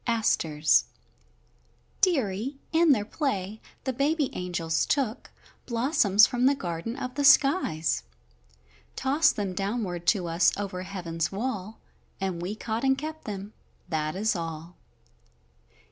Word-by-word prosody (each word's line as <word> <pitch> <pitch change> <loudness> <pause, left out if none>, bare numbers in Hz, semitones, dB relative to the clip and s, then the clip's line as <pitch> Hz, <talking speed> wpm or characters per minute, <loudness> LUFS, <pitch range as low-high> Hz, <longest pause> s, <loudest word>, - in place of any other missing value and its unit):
ASTERS 160 -10 +2 1.2
Dearie, 265 - +1
in 325 -1 +5
their 210 -7 +2
play 215 - -3 0.2
the 260 - -2
baby 285 +2 +1
angels 175 -3 -1
took 265 -5 -1 0.4
Blossoms 230 -4 +4
from 245 +1 +1
the 280 - +4
garden 175 +1 -4
of 255 -2 -5
the 285 - -2
skies. 275 - +4 0.9
Tossed 295 +4 +2
them 200 -3 -2
downward 195 -3 -3
to 185 -5 +2
us 170 +1 +3
over 195 -3 -4
heaven's 175 -4 -3
wall, 215 -1 -4 0.4
And 190 -3 -3
we 185 +4 -3
caught 220 +2 -3
and 265 0 +3
kept 315 +2 -6
them, 205 0 -6 0.4
that 155 -1 -1
is 215 +2 +1
all. 165 0 -6
210 Hz, 125 wpm, -27 LUFS, 180-265 Hz, 1.2 s, in